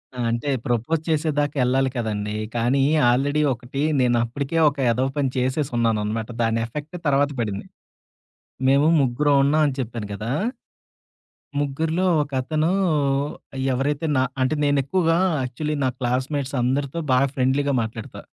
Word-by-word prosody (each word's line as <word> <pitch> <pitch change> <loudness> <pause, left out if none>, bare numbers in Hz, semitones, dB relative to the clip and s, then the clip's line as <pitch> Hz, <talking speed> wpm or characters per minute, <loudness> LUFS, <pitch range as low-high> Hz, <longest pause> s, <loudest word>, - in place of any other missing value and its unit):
ఆ! - - -10
అంటే, 120 +5 -2 0.2
ప్రపోజ్ 120 +6 0
చేసేదాకా 150 -2 0
యెళ్ళాలి 130 +2 +2
కదండీ! 105 -3 -2 0.2
కానీ 125 +4 +2 0.3
ఆల్రెడీ 145 +4 +1
ఒకటి 125 +3 -6 0.2
నేనప్పటికే 125 +5 0
ఒక 145 - -11
ఎదవ 125 +3 +1
పని 140 -2 +1
చేసేసున్నానన్నమాట. 115 -5 0
దాని 115 0 +1
ఎఫెక్ట్ 150 +8 -7
తర్వాత 145 0 +3
పడింది. 105 -4 -3 1.0
మేము 140 +3 +4
ముగ్గురం 140 +3 +2
ఉన్నాం 150 +3 +3
అని 140 - -2
చెప్పాను 115 -4 -4
కదా! 110 +4 -4 1.3
ముగ్గురిలో 160 +5 -1 0.2
ఒకతనూ, 145 +4 -1 1.0
ఎవరైతే 140 +4 -1 0.4
అంటే 130 +4 +1
నా - - 0
నేనెక్కువగా 155 +4 +2 0.3
యాక్చువల్లీ 150 +5 -3
నా - - +2
క్లాస్‌మేట్స్ 130 +3 -1
అందరితో 135 +5 -1
బా 130 - +5 0.2
ఫ్రెండ్లీగా 140 +2 +1
మాట్లాడతా. 110 0 -6
135 Hz, 120 wpm, -23 LUFS, 120-145 Hz, 1.3 s, బా